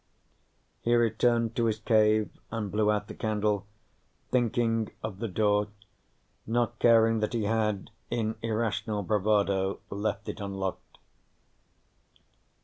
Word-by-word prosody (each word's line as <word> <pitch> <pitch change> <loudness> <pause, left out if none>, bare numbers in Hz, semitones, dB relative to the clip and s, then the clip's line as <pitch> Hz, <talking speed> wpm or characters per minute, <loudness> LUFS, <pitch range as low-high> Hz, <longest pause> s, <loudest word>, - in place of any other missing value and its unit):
He 120 +1 +2
returned 115 0 +2
to 120 - +1
his 110 -1 +1
cave 110 -1 +3 0.2
and 110 -3 -3
blew 105 0 +2
out 105 -1 0
the - - -7
candle, 105 -2 -1 0.6
thinking 115 -2 +1
of 105 -3 -5
the 115 - -2
door, 105 +1 +2 0.8
not 120 0 0
caring 115 -1 +5
that 105 +3 -1
he 115 -2 0
had, 105 -1 0 0.2
in 110 -2 -1
irrational 110 -2 -1
bravado, 100 -1 +1
left 100 +2 -2
it - - -5
unlocked. 95 -2 -5
110 Hz, 120 wpm, -28 LUFS, 105-115 Hz, 0.8 s, caring